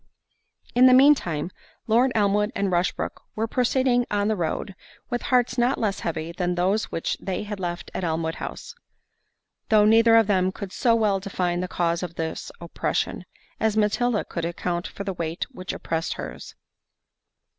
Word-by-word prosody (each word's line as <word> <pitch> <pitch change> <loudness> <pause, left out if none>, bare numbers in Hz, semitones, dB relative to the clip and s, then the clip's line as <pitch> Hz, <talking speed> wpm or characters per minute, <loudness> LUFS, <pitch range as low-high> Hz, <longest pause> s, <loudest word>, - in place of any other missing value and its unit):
In 250 +2 +7
the 255 - +7
mean 280 +3 +8
time, 170 - -4 0.3
Lord 240 +4 +3
Elmwood 210 0 +2
and 200 -1 0
Rushbrook 175 0 -1
were 220 - 0
proceeding 250 +1 +1
on 205 0 +1
the 220 - +1
road, 180 +2 -3 0.4
with 240 - -1
hearts 245 -1 +1
not 245 +3 +2
less 205 -3 -1
heavy 160 0 -3
than 180 0 -1
those 190 +5 +1
which 165 - -3
they 190 +1 -3
had 205 -1 -6
left 175 -2 -4
at - - -3
Elmwood 160 -1 -1
House; 485 - -6 1.0
though 215 -1 +5
neither 225 +1 +6
of 225 -1 +6
them 190 -2 +2
could 200 0 -7
so 235 -2 +3
well 210 -4 +2
define 180 -3 -2
the 180 - -2
cause 170 -1 0
of 175 -2 -5
this 160 0 -4
oppression, 170 -1 -2 0.3
as 220 -1 +1
Matilda 215 +1 +1
could 170 - -5
account 175 +1 -2
for 200 - -7
the 195 -1 -3
weight 165 -1 -3
which 185 -7 -6
oppressed 165 0 -2
her's. - - -8
200 Hz, 170 wpm, -24 LUFS, 175-225 Hz, 1.0 s, mean